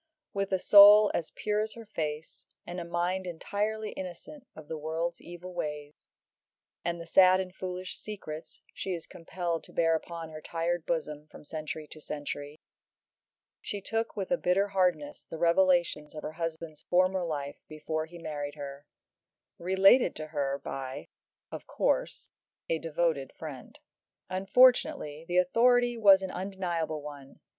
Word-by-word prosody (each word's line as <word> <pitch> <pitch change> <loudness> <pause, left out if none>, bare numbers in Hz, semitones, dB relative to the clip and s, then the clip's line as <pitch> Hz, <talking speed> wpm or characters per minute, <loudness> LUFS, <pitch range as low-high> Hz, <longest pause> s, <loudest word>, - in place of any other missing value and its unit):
With 195 -1 -2
a 190 - +3
soul 205 +2 +9
as 165 - -2
pure 210 0 -1
as 215 0 -3
her 230 -1 -10
face, 155 -6 -5 0.2
and 175 +1 -5
a - - -4
mind 175 +2 -1
entirely 210 +5 -2
innocent 190 - -9
of 155 -2 -11
the 160 - -4
world's 165 +2 -3
evil 175 +1 -9
ways 150 -2 -6 0.8
and 170 0 -2
the 170 - -7
sad 185 +1 +6
and 185 -1 -4
foolish 185 0 -5
secrets 165 -7 -8
she 190 -2 -3
is 165 - -8
compelled 170 0 -4
to - - -15
bear 165 -1 +2
upon 165 0 -4
her 155 0 -8
tired 170 +1 -2
bosom 150 -2 -3
from 150 - -14
century 155 0 -6
to 155 - -11
century 145 0 -6 1.0
she 205 - -4
took 225 +3 -2
with 195 +2 -3
a 265 - +3
bitter 195 +3 +2
hardness 180 -7 0
the 165 - -6
revelations 170 -3 +2
of 150 - -7
her - - -4
husband's 165 -1 -5
former 185 +1 +2
life 145 -4 -4
before 155 +1 -4
he 175 +1 -11
married 145 -3 -5
her, 140 0 -8 0.7
related 190 +4 +5
to 155 - -6
her 140 -3 -1
by 135 -1 -6 0.4
of - - -8
course - - -1 0.4
a 165 - 0
devoted 160 -4 -1
friend. 145 -6 -9 0.5
Unfortunately 195 - +3
the 175 - 0
authority 240 +6 +4
was 200 -4 +6
an 190 - -3
undeniable 175 -5 -3
one. 145 -2 -10
170 Hz, 150 wpm, -29 LUFS, 155-190 Hz, 1.0 s, soul